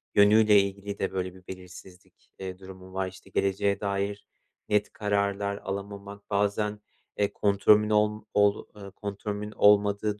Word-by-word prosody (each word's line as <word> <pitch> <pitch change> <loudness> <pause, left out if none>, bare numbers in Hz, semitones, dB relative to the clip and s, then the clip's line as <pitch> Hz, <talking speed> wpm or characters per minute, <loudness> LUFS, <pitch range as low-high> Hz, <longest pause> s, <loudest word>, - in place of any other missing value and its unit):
yönüyle 105 0 +6
ilgili 100 +1 -5
de 95 - -1
böyle 90 -1 -3
bir 95 -1 -18
belirsizlik, 90 0 -13
eee, 95 -1 -6
durumum 95 0 -12
var. 95 0 -1
İşte, 95 +1 -12
geleceğe 100 +1 0
dair 100 0 -2 0.4
net 105 0 +1
kararlar 100 -1 -1
alamamak, 100 +1 -7
bazen, 105 +1 0 0.4
eee, 100 -1 0
kontrolümün 105 +1 +3
olm 105 0 +1
ol 105 0 +3
eee, 100 -2 -10
kontrolümün 105 +1 -5
olmadığı 105 0 +3
100 Hz, 135 wpm, -27 LUFS, 95-105 Hz, 0.4 s, yönüyle